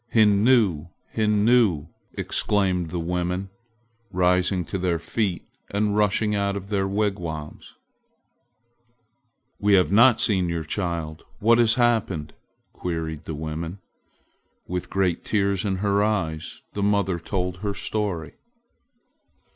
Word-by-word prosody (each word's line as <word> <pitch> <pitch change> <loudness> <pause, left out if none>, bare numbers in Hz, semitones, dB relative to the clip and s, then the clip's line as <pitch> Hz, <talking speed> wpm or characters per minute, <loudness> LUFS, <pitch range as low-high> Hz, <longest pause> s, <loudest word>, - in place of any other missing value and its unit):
"Hinnu! 105 - +4 0.3
Hinnu!" 105 -6 +3 0.3
exclaimed 95 -5 0
the 90 - -4
women, 90 +3 -2 0.6
rising 90 0 +2
to 95 - -4
their 90 -2 0
feet 95 +2 -2 0.2
and 105 0 0
rushing 105 0 +2
out 100 -1 0
of 100 0 -8
their 100 -2 0
wigwams. 95 -7 -3 1.8
"We 105 0 +3
have 90 -1 +3
not 120 +2 +6
seen 95 -6 +2
your 85 -1 -2
child! 85 -2 -3
What 115 +3 +4
has 115 -1 +4
happened?" 110 -11 +1 0.4
queried 80 -3 -4
the 80 - -5
women. 80 +4 -5 0.9
With 90 0 -4
great 95 -3 0
tears 100 -3 0
in 100 -3 0
her 100 +1 +1
eyes 80 -7 -2
the 100 - -3
mother 100 -3 +1
told 90 +1 -3
her 100 +1 -3
story. 100 -9 -3
95 Hz, 115 wpm, -24 LUFS, 85-105 Hz, 1.8 s, not